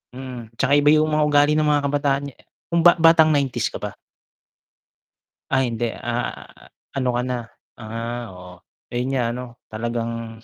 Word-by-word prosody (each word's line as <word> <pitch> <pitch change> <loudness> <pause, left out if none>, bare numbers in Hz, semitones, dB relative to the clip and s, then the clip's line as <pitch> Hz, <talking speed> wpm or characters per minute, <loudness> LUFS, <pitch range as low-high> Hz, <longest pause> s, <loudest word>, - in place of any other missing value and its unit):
Mm, 125 -3 -7
'tsaka 135 +3 +1
iba 145 0 +4
'yung 155 0 +3
mga 150 0 +3
ugali 145 0 +4
ng 155 -1 +2
mga 145 -1 +2
kabataan 140 -1 0
nga - - -28 0.4
kung 170 0 +3
ba 175 - +8
batang 160 -1 +6
90's 140 -4 +1
ka - - -10
ba? - - -6 1.6
Ay 130 -3 +2
hindi, 115 +1 -1
ah, 120 0 -4 0.5
ano 130 -2 -1
ka 120 - +1
na 125 -1 -2 0.4
ah, 115 +2 -5
oo 90 0 -11 0.4
ayun 120 +1 -1
nga 125 - +1
ano, 125 +1 -5 0.3
talagang 115 0 -4
130 Hz, 160 wpm, -22 LUFS, 120-145 Hz, 1.6 s, ba